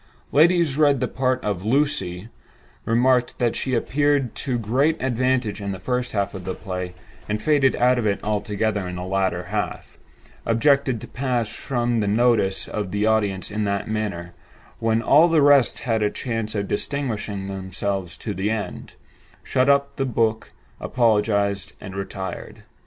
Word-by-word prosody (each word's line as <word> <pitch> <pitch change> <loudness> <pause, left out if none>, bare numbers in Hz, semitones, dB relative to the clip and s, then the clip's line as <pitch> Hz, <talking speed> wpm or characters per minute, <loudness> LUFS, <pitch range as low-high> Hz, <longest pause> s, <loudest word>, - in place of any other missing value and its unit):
Ladies 165 -2 +4
read 145 -3 +4
the - - 0
part 130 -1 -1
of 100 -3 -2
"Lucy"; 110 -6 0 0.6
remarked 125 +2 +2
that 120 -2 0
she 130 -1 -1
appeared 140 +1 +1
to 130 -3 -2
great 130 +8 +1
advantage 125 -4 0
in 100 -1 -3
the 95 - -7
first 125 +5 -2
half 100 -1 -1
of 95 -2 -7
the 95 +1 -4
play, 90 -2 -5 0.3
and 105 0 -1
faded 140 +1 +3
out 125 0 +3
of 110 - 0
it 100 - 0
altogether 105 -1 -1
in 90 - -5
the 90 - -5
latter 95 0 -1
half; - - -4 0.4
objected 130 +1 +2
to - - -8
pass 125 -4 -2
from 120 -2 -1
the 105 - 0
notice 110 -3 +2
of 105 -3 -3
the 105 +2 0
audience 105 -3 0
in 105 +1 -1
that 100 0 -1
manner, 100 -6 -3 0.5
when 115 0 +1
all 155 +7 +6
the 165 -2 +3
rest 140 -3 +4
had 115 -3 0
a 105 - +2
chance 115 -2 -3
of 100 -1 -1
distinguishing 110 -6 -2
themselves 95 -1 -4
to - - -4
the 95 +3 -1
end; 110 -2 -4 0.5
shut 130 +2 +1
up 140 0 +2
the 135 - 0
book, 115 -3 0 0.3
apologized, 105 -4 +1
and 95 - -9
retired. 95 -1 -6
110 Hz, 165 wpm, -23 LUFS, 100-130 Hz, 0.6 s, all